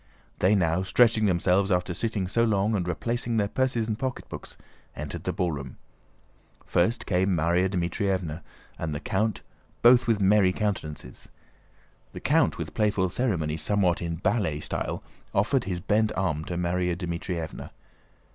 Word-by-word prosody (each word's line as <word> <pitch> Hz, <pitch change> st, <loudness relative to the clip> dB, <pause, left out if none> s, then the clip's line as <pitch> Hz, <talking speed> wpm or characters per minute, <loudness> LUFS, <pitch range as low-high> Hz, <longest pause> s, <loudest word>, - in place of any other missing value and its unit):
They 95 Hz, +3 st, +4 dB
now, 85 Hz, -2 st, +2 dB
stretching 110 Hz, +3 st, +3 dB
themselves 95 Hz, +2 st, +2 dB
after 90 Hz, -1 st, +1 dB
sitting 105 Hz, -1 st, -2 dB
so 115 Hz, +5 st, +2 dB
long, 105 Hz, -1 st, +2 dB
and 90 Hz, -4 st, -1 dB
replacing 115 Hz, +6 st, -1 dB
their 100 Hz, -2 st, +2 dB
purses 125 Hz, -1 st, 0 dB
and 110 Hz, 0 st, -2 dB
pocketbooks, 130 Hz, -2 st, -5 dB, 0.4 s
entered 75 Hz, 0 st, -6 dB
the -, -, 0 dB
ballroom. 75 Hz, -7 st, -3 dB, 0.9 s
First 90 Hz, +7 st, +1 dB
came 95 Hz, +1 st, +1 dB
Márya 85 Hz, +4 st, +2 dB
Dmítrievna 90 Hz, -2 st, -1 dB, 0.4 s
and 80 Hz, -2 st, -3 dB
the -, -, -3 dB
count, 105 Hz, +6 st, -1 dB, 0.4 s
both 120 Hz, +1 st, +7 dB
with 115 Hz, -3 st, +2 dB
merry 95 Hz, -1 st, +4 dB
countenances. 80 Hz, -, -4 dB, 0.8 s
The -, -, -6 dB
count, -, -, +2 dB
with -, -, -5 dB
playful 105 Hz, -4 st, +1 dB
ceremony 85 Hz, -9 st, -1 dB
somewhat 95 Hz, -1 st, +1 dB
in 85 Hz, -1 st, -2 dB
ballet 90 Hz, -4 st, 0 dB
style, -, -, -3 dB, 0.3 s
offered 115 Hz, +5 st, +2 dB
his 90 Hz, -2 st, -2 dB
bent 105 Hz, +4 st, +1 dB
arm 80 Hz, -5 st, -1 dB
to 90 Hz, -, -4 dB
Márya 90 Hz, 0 st, 0 dB
Dmítrievna. 85 Hz, -2 st, -4 dB
95 Hz, 145 wpm, -27 LUFS, 85-105 Hz, 0.9 s, both